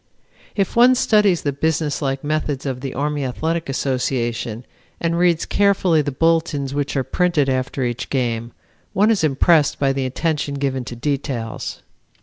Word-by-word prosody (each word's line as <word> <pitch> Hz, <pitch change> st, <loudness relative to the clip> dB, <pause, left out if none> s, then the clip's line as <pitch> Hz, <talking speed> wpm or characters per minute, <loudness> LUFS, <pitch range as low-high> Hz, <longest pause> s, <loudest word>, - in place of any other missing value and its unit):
If 195 Hz, -2 st, -1 dB
one 245 Hz, +2 st, +6 dB
studies 210 Hz, -7 st, +3 dB
the 145 Hz, -, 0 dB
businesslike 145 Hz, -2 st, -1 dB
methods 145 Hz, -2 st, -2 dB
of 130 Hz, -2 st, -3 dB
the 135 Hz, -1 st, -5 dB
Army 145 Hz, +1 st, -1 dB
Athletic 160 Hz, +5 st, -2 dB
Association 125 Hz, -3 st, -2 dB, 0.3 s
and 170 Hz, 0 st, 0 dB
reads 170 Hz, -1 st, +2 dB
carefully 195 Hz, -5 st, +3 dB
the 145 Hz, -1 st, -2 dB
bulletins 160 Hz, -2 st, +1 dB
which 145 Hz, 0 st, -2 dB
are 135 Hz, -, +1 dB
printed 170 Hz, -2 st, +1 dB
after 130 Hz, 0 st, -1 dB
each 120 Hz, +1 st, -3 dB
game, 120 Hz, -3 st, -1 dB, 0.4 s
one 210 Hz, +3 st, +4 dB
is 210 Hz, -7 st, +1 dB
impressed 150 Hz, +1 st, +3 dB
by 135 Hz, -1 st, +1 dB
the 135 Hz, -1 st, -1 dB
attention 150 Hz, +1 st, -2 dB
given 135 Hz, -2 st, -1 dB
to 120 Hz, -, -7 dB
details. 130 Hz, -3 st, -3 dB
145 Hz, 150 wpm, -20 LUFS, 130-165 Hz, 0.4 s, one